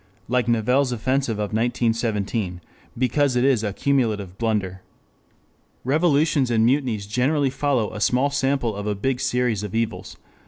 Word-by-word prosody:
] - - -35
like 125 -2 +1
Nivelle's 125 +4 +2
offensive 130 0 0
of 105 0 -3
1917, 110 -4 -1 0.4
because 130 +2 +1
it 125 - +2
is 130 -5 +2
a 105 - -1
cumulative 110 -7 0
blunder. 100 -5 -1 1.0
Revolutions 145 -1 +2
and 115 -1 +3
mutinies 120 -5 0
generally 135 +6 +1
follow 135 -5 0
a 105 - -6
small 130 +6 +2
sample 135 -5 0
of 100 +1 -5
a 105 - 0
big 125 +5 -1
series 125 -5 0
of 105 0 -6
evils. 115 -1 -3
120 Hz, 150 wpm, -23 LUFS, 105-135 Hz, 1.0 s, and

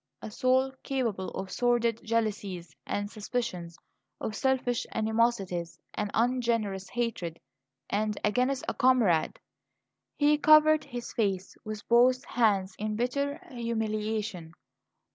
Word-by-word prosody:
A 220 - -8
soul 260 +3 +2
capable 230 -9 -2
of 190 -1 -6
sordid 240 -2 +1
jealousies 205 -8 -2
and 205 0 -1
suspicions; 205 -7 -4 0.4
of 215 - -4
selfish 255 -1 0
animosities 220 -6 0
and 210 -1 -2
ungenerous 230 -5 0
hatred 225 -9 -3 0.5
and 210 0 -1
against 250 +5 +1
a - - 0
comrade! 245 -11 +3 0.8
He 295 0 +4
covered 310 0 +6
his 240 -1 -7
face 195 -4 -1
with 215 -1 -7
both 250 +2 +4
hands 200 -5 +1
in 215 0 -2
bitter 280 +5 -1
humiliation. 215 -6 -3
225 Hz, 110 wpm, -29 LUFS, 205-250 Hz, 0.8 s, covered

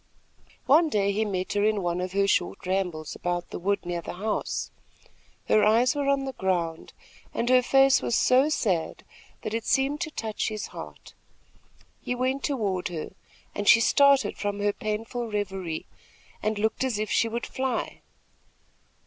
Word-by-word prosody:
One 315 +4 +5
day 200 -5 +1
he 215 +2 0
met 185 -3 -2
her 205 0 +1
in 210 -2 +1
one 175 0 -1
of 180 0 -4
her 200 0 +2
short 190 +1 0
rambles 180 -5 -2
about 175 0 -3
the - - -5
wood 200 +1 -1
near 175 -1 -3
the - - -7
house. 210 +4 -2 0.8
Her 215 - +4
eyes 230 +5 +4
were 285 -1 -1
on 275 -1 +1
the 265 - -4
ground, 170 -5 -2 0.4
and 240 - 0
her 255 0 +6
face 270 +2 +4
was - - 0
so 260 +4 +4
sad 190 - -1 0.4
that 215 - -4
it 225 0 -1
seemed 275 +5 +1
to 330 - -2
touch 220 -7 -3
his 215 -1 -4
heart. - - -10 0.9
He 250 - -3
went 260 +2 -1
toward 205 -10 -1
her, 165 -3 -6 0.4
and 205 0 -4
she - - +8
started 280 +3 +4
from 205 0 -2
her 205 0 +1
painful 225 +3 -4
reverie 190 -6 -3 0.6
and 215 0 -1
looked 220 +4 0
as 255 -5 -1
if 215 0 -3
she 230 - +2
would 235 +1 -3
fly. 260 -3 -3
215 Hz, 170 wpm, -26 LUFS, 190-255 Hz, 0.9 s, she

